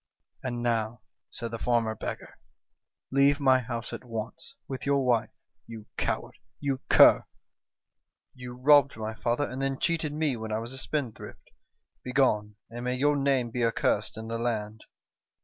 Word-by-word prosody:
"'And 120 -2 -3
now,' 115 -1 -1 0.3
said 115 -1 -6
the 115 - -5
former 115 -2 +1
beggar, - - -7 0.7
'leave 140 +2 +4
my 130 -2 +5
house 120 -1 -5
at - - -6
once, 115 - -6
with 130 -1 -5
your 140 -1 +2
wife 120 -3 +2 0.4
you 115 -2 -9
coward! - - -3 0.2
you 140 -2 -1
cur! - - +7 1.1
You 125 -1 -8
robbed 140 0 +5
my 110 0 -4
father, 120 +5 -1
and 130 +2 -5
then 135 0 -1
cheated 165 -2 0
me 150 -3 0
when 110 -1 -6
I 110 - 0
was 115 +3 -5
a 130 - -5
spendthrift. 130 -5 -5 0.5
Begone, 110 -6 +1 0.2
and 120 +1 -6
may 125 0 -1
your 145 +3 +2
name 135 -4 +1
be 120 +1 -1
accursed 110 -2 0
in 110 0 -6
the 115 0 -3
land 110 -2 -3
125 Hz, 160 wpm, -28 LUFS, 115-135 Hz, 1.1 s, cur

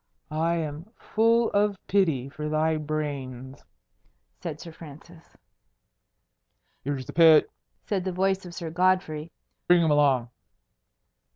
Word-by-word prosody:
"I 165 +2 0
am 160 +3 -5
full 230 +1 +2
of 205 0 +1
pity 160 -10 +1
for 150 +2 -6
thy 155 +1 +1
brains," 140 -4 -5 0.8
said 155 -3 -5
Sir 170 - -9
Francis. 165 +2 -14 1.5
"Here's 135 -1 -3
the - - -9
pit!" 160 -2 +6 0.3
said 195 -3 -1
the 190 - -2
voice 190 +1 0
of 175 -1 -10
Sir 165 -2 -5
Godfrey. 175 -3 0 0.4
"Bring 175 -1 +5
him 160 - +2
along." 135 -5 +2
160 Hz, 120 wpm, -26 LUFS, 150-180 Hz, 1.5 s, pit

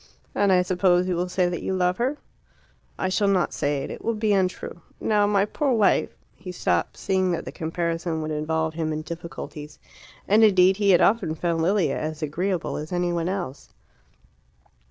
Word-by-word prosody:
"And 200 -1 +2
I 180 -1 +4
suppose 180 0 +2
you 180 - 0
will 180 +1 -2
say 180 0 +1
that 175 -1 -3
you 190 - -2
love 180 0 +1
her." 260 +5 -1 0.8
"I 190 - -1
shall 195 +2 +1
not 190 -3 +1
say 145 -1 -1
it. - - -6
It - - -8
will 230 - 0
be 215 -1 +1
untrue. 185 -2 -1 0.2
Now 210 -2 +2
my 200 -1 +2
poor 275 +5 0
wife 215 -4 +2
" - - -41
He 180 0 -8
stopped, 180 - -1
seeing 190 -1 0
that 170 - -3
the - - -6
comparison 165 0 -2
would 155 - -4
involve 160 +1 -1
him 160 -1 -2
in 155 0 -3
difficulties. 165 -3 -8 0.5
And 215 +3 +5
indeed 190 -2 +5
he 205 -1 +2
had 180 - +6
often 200 -7 +2
found 165 0 -1
Lilia 190 +2 +1
as 155 +1 -4
agreeable 175 +4 -2
as 155 +3 -6
any 175 -1 0
one 170 0 -1
else. 180 -8 -5
180 Hz, 195 wpm, -24 LUFS, 165-195 Hz, 0.8 s, had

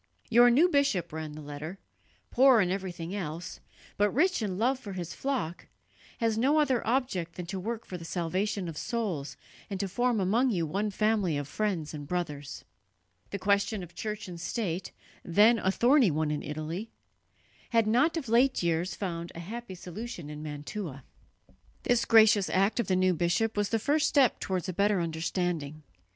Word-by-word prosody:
"Your 240 +1 +7
new 285 +9 +5
bishop," 275 - +1
ran 155 -1 -5
the 155 0 -9
letter, 150 +5 -7 0.5
"poor 260 -1 +6
in 180 -3 +2
everything 185 -2 -4
else, 170 -4 -5 0.4
but 205 0 +3
rich 355 - +2
in 195 -4 -2
love 255 +5 +1
for 200 -6 -8
his 175 -3 -5
flock, 255 -12 -3 0.5
has 225 -1 0
no 285 +6 +3
other 265 -5 +2
object 225 -9 -1
than 180 - -5
to 190 +2 -4
work 225 +4 -4
for 180 - -7
the - - -9
salvation 185 +3 -2
of 160 -3 -5
souls 195 -12 -3 0.3
and 195 -2 -4
to 200 - -1
form 240 +4 +1
among 220 +8 +2
you 175 -8 0
one 200 +7 -1
family 205 -5 +1
of 145 -1 -4
friends 175 -3 -2
and 145 -2 -7
brothers." 150 -5 -4 0.6
The 200 - -3
question 200 +1 +1
of 175 - -11
church 210 -2 -5
and 175 -2 -8
state, 185 -4 -3 0.3
then 210 +7 +5
a 190 - +1
thorny 245 +3 +4
one 155 -1 0
in 150 - -2
Italy, 155 +8 -5 0.8
had 230 -2 +3
not 270 +10 +3
of 290 -6 -4
late 240 0 +3
years 170 +2 0
found 170 -3 -4
a - - -7
happy 210 +3 -7
solution 180 -3 -7
in 150 0 -7
Mantua. 150 - -6 0.8
This 245 -1 +2
gracious 220 -3 +6
act 195 +5 +2
of 235 - 0
the 185 - +2
new 185 0 +3
bishop 175 +7 0
was 205 -1 0
the 225 - +1
first 290 +7 +2
step 270 -6 +3
towards 185 -1 -2
a 185 - -3
better 200 +1 +2
understanding. 160 -2 -2
195 Hz, 180 wpm, -29 LUFS, 170-230 Hz, 0.8 s, Your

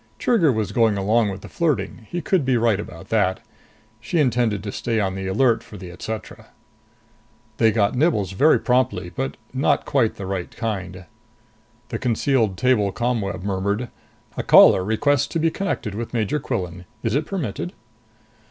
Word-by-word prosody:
Trigger 190 - +3
was 110 -4 -2
going 110 -1 +2
along 105 +3 +2
with 95 0 -6
the - - -10
flirting; 150 -8 -2
he 175 - -3
could 175 +1 +1
be 130 -2 +2
right 115 -3 +2
about 85 -5 -9
that. 100 -4 +1 0.6
She 120 +10 -3
intended 120 - +1
to 100 - -4
stay 115 +2 -1
on 95 -2 0
the 95 0 -4
alert 115 +4 +2
for 105 - -12
the 90 -2 -9
etc. 110 +4 -7 1.1
They 115 -1 +4
got 105 -2 +1
nibbles 125 - +1
very 145 +12 +4
promptly. 125 -8 0
But 135 0 -4 0.2
not 135 +2 +1
quite 130 -6 +1
the 100 - -6
right 95 -2 -3
kind. 95 -5 -5 0.8
The - - -4
concealed 115 -4 +1
table 125 -6 +2
ComWeb 110 -4 -2
murmured, 100 +4 -1 0.5
"A - - -2
caller 95 - +7
requests 120 +7 +1
to 165 - -2
be 165 0 +2
connected 170 - -3
with 115 +3 -5
Major 115 +7 0
Quillan. 90 - -4 0.2
Is - - 0
it 150 +3 0
permitted?" 110 - -4
110 Hz, 165 wpm, -22 LUFS, 95-130 Hz, 1.1 s, caller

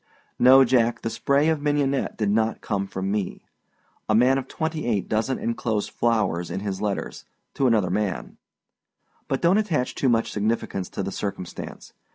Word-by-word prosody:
No, 130 +2 +8
Jack, 120 -1 +2
the 115 - -2
spray 140 +6 +2
of 160 -2 0
mignonette 145 -2 0
did 105 -2 0
not 110 +1 +1
come 100 -2 -2
from 95 0 -3
me. 100 -3 -3 0.6
A 110 - +4
man 130 +4 +4
of 130 - -7
twenty 160 -3 -3
eight 105 -5 0
doesnât 110 +4 0
enclose 115 -2 -1
flowers 110 -7 0
in 95 - -4
his 100 -1 -4
letters 105 -2 -3 0.3
to 135 - +1
another 110 -6 +2
man. 105 -3 -2 0.9
But 135 +3 -2
donât 180 +5 +5
attach 150 -10 -1
too 135 - +1
much 115 -1 +1
significance 105 -3 -2
to - - -4
the 95 - -3
circumstance. 100 -2 -6
115 Hz, 170 wpm, -24 LUFS, 100-135 Hz, 0.9 s, No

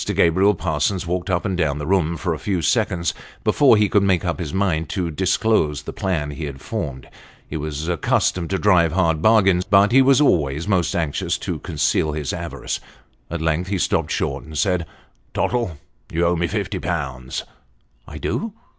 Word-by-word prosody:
Gabriel 95 +5 +4
Parsons 85 +4 -1
walked 90 +3 -2
up 90 +1 0
and 95 -3 -1
down 75 -5 0
the 75 - -4
room 85 -2 +1
for 90 -2 -1
a 75 - -5
few 95 -5 -2
seconds, 85 +3 +1 0.3
before 135 -6 +5
he 105 0 +3
could 100 +1 +3
make 95 -3 +2
up 85 0 -2
his 80 -5 -4
mind 85 -5 0
to 90 -3 -2
disclose 95 -3 +1
the - - -7
plan 80 -7 -2
he 75 +2 -5
had 70 -2 -7
formed; 75 - -5 0.4
he - - -7
was 75 0 -4
accustomed 85 0 0
to 95 - 0
drive 90 -5 +3
hard 85 -4 +1
bargains, 95 -4 +4
but 100 +2 +4
was 135 +1 +6
always 80 - +2
most 95 -4 +1
anxious 80 -4 -1
to - - -4
conceal 75 -1 0
his 75 -3 -3
avarice. - - -4 0.5
At 85 -1 -4
length 80 +3 0
he 100 0 -1
stopped - - 0
short, 70 0 -2
and 80 -1 -8
said 85 +2 +1 0.2
" - - -39
Tottle, 115 -10 -1 0.3
you 85 +1 +1
owe 85 +1 +2
me 85 +1 0
fifty 100 0 -3
pounds." 65 -8 -3 0.6
I - - -8
do." 220 -1 -3
85 Hz, 185 wpm, -21 LUFS, 75-95 Hz, 0.6 s, was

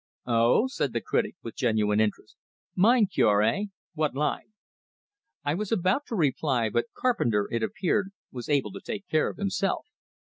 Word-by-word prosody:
"Oh!" 120 - +3
said 145 - -2
the - - -1
critic, - - -1
with 115 - -7
genuine 110 -4 +1
interest. 110 -1 -1 0.4
"Mind 215 +1 +4
cure, 105 - +4
hey? 200 - +1 0.3
What 155 -3 -1
line?" 150 +8 -2 0.9
I 145 0 0
was 205 +4 -3
about 195 +6 +1
to 230 - -3
reply, 135 - +1
but 120 +6 0
Carpenter, 120 - +1
it 115 - -1
appeared, 190 - 0 0.2
was 125 +1 -7
able 140 -2 +1
to 195 - -8
take 205 -3 -5
care 155 - +2
of - - -9
himself. 195 -1 -1
150 Hz, 160 wpm, -27 LUFS, -, 0.9 s, Mind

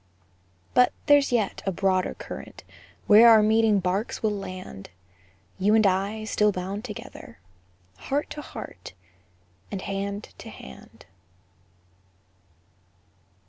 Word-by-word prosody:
But 250 0 +4
there's 290 -2 +4
yet 220 -5 0
a - - +2
broader 185 0 0
current, - - -9 0.4
Where 220 +3 +8
our 220 -2 +7
meeting 220 -1 +3
barks 190 +6 -2
will 215 - +2
land; 185 - -8 0.7
You 205 +3 +3
and 220 -1 +4
I 200 +3 0
still 210 -1 +2
bound 195 +3 -5
together, 215 -5 -10 0.6
Heart 285 - -3
to 300 - -6
heart, 90 - -10 0.8
and 190 -2 -5
hand 200 +1 -5
to - - -9
hand. 65 0 -13
205 Hz, 110 wpm, -25 LUFS, 190-220 Hz, 0.8 s, Where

